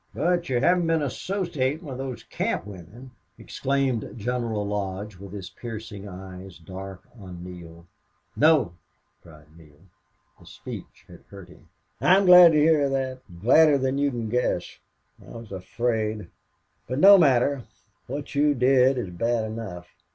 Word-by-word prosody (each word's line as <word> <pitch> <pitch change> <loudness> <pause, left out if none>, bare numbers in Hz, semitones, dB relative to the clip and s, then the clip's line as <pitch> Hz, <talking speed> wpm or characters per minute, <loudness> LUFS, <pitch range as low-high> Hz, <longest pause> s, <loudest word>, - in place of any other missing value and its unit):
"But 175 -1 0
you 125 -2 +1
haven't 175 +5 +2
been 165 -2 +1
associating 160 - -3
with 130 -3 -7
those 130 -3 -6
camp - - -3
women!" 105 +6 -12 0.3
exclaimed 135 -4 -2
General 115 -2 -2
Lodge, 100 0 -4
with 100 0 -11
his 100 -1 -8
piercing 110 -3 -8
eyes 95 0 -10
dark 95 +2 -9 0.2
on 90 -3 -10
Neale. 85 -2 -11 0.5
"No!" 150 - +3 0.5
cried 75 -1 -18
Neale. 75 -1 -19 0.6
The - - -18
speech - - -10
had - - -15
hurt 100 -2 -12
him. 85 - -19 0.3
"I'm 185 +8 +4
glad 180 -2 +9
to - - +3
hear 150 -2 +3
that 130 -1 -2 0.2
gladder 150 +4 +6
than 135 +1 -1
you 145 0 +2
can 120 -4 -4
guess. 125 +3 -2 0.4
I - - -13
was 115 -3 -12
afraid 110 0 -3 0.6
But 130 - -3
no 195 +5 +8
matter.... 140 -2 +3 0.5
What 140 +3 -6
you 145 0 +2
did 130 +1 +4
do 125 - -2
is 95 - -7
bad 115 +5 -1
enough. 110 -6 -7
120 Hz, 150 wpm, -25 LUFS, 95-140 Hz, 0.6 s, glad